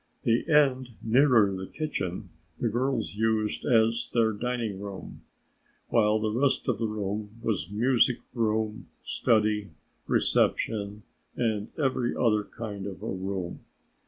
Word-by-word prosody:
The 115 +6 +1
end 130 -4 +3
nearer 115 -4 +4
the 95 0 -5
kitchen 95 - -4 0.3
the 120 - +1
girls 120 0 -1
used 110 0 0
as 115 0 +3
their 115 -2 +3
dining 115 -2 -2
room, 100 -1 -8 0.7
while 105 -2 +3
the 110 0 -1
rest 130 +5 +1
of 125 -5 0
the 115 - 0
room 105 +1 -4
was 110 -5 -2
music 120 +3 +3 0.2
room, 110 -2 -1 0.2
study, 105 -2 +1 0.4
reception 105 -1 +1 0.3
and 110 -3 0
every 130 -5 0
other 105 -3 +2
kind 105 -3 -6
of 95 - -8
a - - -3
room. 95 -1 -4
110 Hz, 130 wpm, -28 LUFS, 105-120 Hz, 0.7 s, nearer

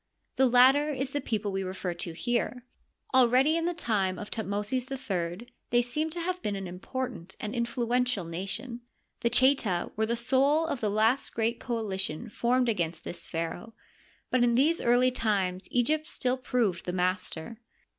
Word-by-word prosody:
The 265 - +4
latter 260 +5 +6
is 270 -2 -2
the 290 - -2
people 210 -4 -2
we 195 0 -2
refer 185 -1 -3
to 170 0 -5
here. 240 +5 -2 0.5
Already 260 +4 +5
in 335 0 0
the 350 - 0
time 195 - 0
of 210 - -8
Thutmosis 215 +4 -2
III 200 -6 -3 0.2
they 240 0 +3
seem 300 +6 -1
to 340 +2 -4
have 365 +1 -2
been 205 - -2
an 195 -1 -5
important 190 +1 -5
and 210 +1 -4
influential 240 -3 0
nation. 200 +9 -5 0.4
The 235 - +1
Cheta 240 -8 +3
were 220 +1 0
the 235 - 0
soul 275 +6 +3
of 285 -5 -2
the 215 - +1
last 220 +6 +1
great 230 +1 0
coalition 205 -5 -3
formed 245 +3 +1
against 175 -7 -1
this - - -6
pharaoh, 170 +7 -4 0.6
but 255 -1 +3
in 235 -1 +3
these 310 +7 +3
early 245 +2 +4
times 195 -6 0
Egypt 305 +6 +1
still 255 -1 0
proved 240 -8 -1
the 180 - -1
master. 185 +3 -2
235 Hz, 165 wpm, -28 LUFS, 195-255 Hz, 0.6 s, latter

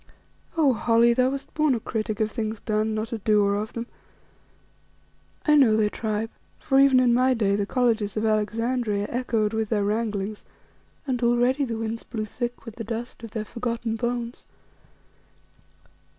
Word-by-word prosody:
Oh, 290 -5 +4
Holly! 235 +1 +4
thou 255 +1 +3
wast 275 +1 -6
born 305 -4 +2
a - - -2
critic 215 0 -3
of 215 -1 0
things 220 -1 -3
done, 215 0 -1
not 220 +2 -3
a 225 - -3
doer 205 -1 +3
of 210 +2 -3
them. 230 0 -4 1.6
I 300 - +4
know 255 -7 +5
thy 210 -1 +2
tribe 220 0 -3 0.3
for 270 -2 +2
even 275 -2 +6
in 245 -2 +4
my 255 +1 +3
day 200 -4 +2
the 200 -1 -1
colleges 225 -5 +1
of 215 - 0
Alexandria 220 0 0
echoed 225 -3 0
with 220 -1 -1
their 210 -3 +1
wranglings 210 -1 -2 0.6
and 255 -3 -1
already 245 +4 +2
the 230 -3 -3
winds 225 0 -3
blew 220 -3 -4
thick 240 +3 -5
with 230 -1 -9
the 230 - -4
dust 230 +2 -5
of 230 - -8
their 215 0 -4
forgotten 235 -1 -3
bones. 240 +1 -3
230 Hz, 165 wpm, -25 LUFS, 215-245 Hz, 1.6 s, even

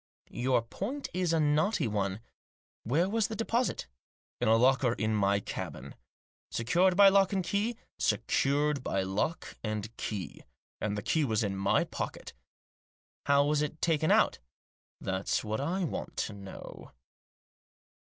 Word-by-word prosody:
"Your 125 -1 +1
point 225 - -5
is 180 -1 0
a 165 - +2
knotty 155 - +2
one. 100 -1 -2 0.6
Where 155 +10 +2
was 220 +1 +1
the 220 - -5
deposit? 230 - 0 0.2
" - - -80
" - - -48
In - - +2
a 110 - +6
locker 130 +1 +4
in 110 -2 -1
my 100 -1 +2
cabin." - - -6 0.3
" - - -82
Secured 175 +11 +2
by 200 -1 +9
lock 195 0 +3
and 190 -1 +1
key? 205 +6 -1
" - - -43
" - - -62
Secured 145 0 +1
by 95 -5 0
lock 95 - -2
and 110 0 -4
key. 95 -9 -5 0.4
And 105 -1 -2
the 105 - -4
key 160 - +1
was 110 -4 +1
in 100 -2 -1
my 95 - +2
pocket" - - -6 0.5
" - - -75
How 140 0 +5
was 150 0 +2
it 150 +1 -3
taken 160 -2 +1
out? - - +4 0.2
" - - -
" - - -77
That's 95 0 -1
what 110 +2 -2
I 180 +7 -1
want 165 - -4
to 110 - -2
know." 100 -1 -10
140 Hz, 175 wpm, -30 LUFS, 110-180 Hz, 0.6 s, by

